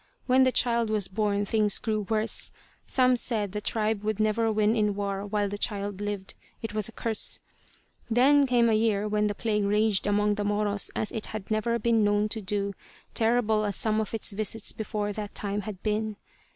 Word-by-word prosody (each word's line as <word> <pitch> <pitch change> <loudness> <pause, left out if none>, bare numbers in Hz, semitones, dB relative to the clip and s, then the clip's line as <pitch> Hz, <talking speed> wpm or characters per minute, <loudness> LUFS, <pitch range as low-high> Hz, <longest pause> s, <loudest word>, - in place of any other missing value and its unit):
When 260 +1 +4
the 260 0 +5
child 235 -2 +2
was 210 -3 0
born 205 0 0
things 210 -1 +2
grew 215 -3 -2
worse. 220 0 -1 0.4
Some 255 -1 +3
said 220 -5 -1
the 210 +1 -4
tribe 215 -1 0
would 215 0 -2
never 220 +1 +2
win 215 +1 +2
in 210 -2 +1
war 200 0 -3
while 205 0 0
the 205 +1 -5
child 205 -2 -2
lived; 205 -2 -4 0.3
it 225 -3 -5
was 215 0 0
a - - -10
curse. 225 -1 0 0.7
Then 275 +4 +5
came 240 -2 +3
a 225 - +3
year 215 -1 +1
when 210 0 +1
the 205 - -2
plague 210 -2 0
raged 210 0 +2
among 210 0 +2
the 205 0 -2
Moros 205 0 0
as 215 - -1
it 220 - -5
had 215 -1 -7
never 235 +2 +1
been 230 -1 +2
known 205 +1 +2
to 220 - -4
do, 200 0 -2 0.4
terrible 220 -2 +2
as 205 -2 -1
some 220 -1 +1
of 220 +1 -4
its 220 - 0
visits 215 +1 -2
before 210 -1 -3
that 205 -1 -6
time 205 0 -1
had 200 -2 -8
been. 215 0 -1
215 Hz, 200 wpm, -27 LUFS, 205-225 Hz, 0.7 s, the